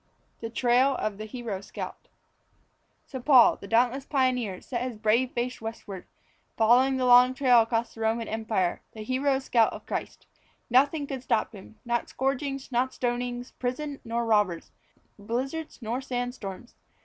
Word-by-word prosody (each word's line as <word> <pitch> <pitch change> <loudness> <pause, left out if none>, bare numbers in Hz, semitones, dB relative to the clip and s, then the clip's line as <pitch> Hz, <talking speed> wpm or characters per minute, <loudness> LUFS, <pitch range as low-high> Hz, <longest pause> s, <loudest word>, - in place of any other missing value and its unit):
The 230 - -5
Trail 250 +3 +3
of 215 -4 -3
the 215 - -5
Hero 215 -4 -5
Scout. - - -8 1.0
So 260 - -7
Paul 255 -2 +6
the 200 - -10
dauntless 245 +5 +2
pioneer 255 -8 0
set 240 -2 -4
his 250 -3 -4
brave 230 +4 +2
face 245 0 -3
westwards, 220 -4 -7 0.5
following 250 +4 +4
the 255 - 0
long 250 +1 +6
trail 250 -3 +5
across 225 +1 -1
the 225 - -10
Roman 225 +1 0
Empire 220 -5 -1
the 215 - -7
hero 265 +4 +1
scout 240 -4 +2
of - - -9
Christ. - - -5 0.5
Nothing 285 +4 +3
could 270 -2 -5
stop 230 -2 0
him 205 +1 -12
not 235 0 -1
scourgings 270 0 -2
nor 245 +1 +2
stonings, 245 0 -3
prison 275 +3 -3
nor 235 0 -2
robbers, 210 -7 +1 0.5
blizzards 260 +7 -4
nor 235 +4 -2
sand 245 -2 -3
storms. 195 0 -8
245 Hz, 155 wpm, -27 LUFS, 225-260 Hz, 1.0 s, Paul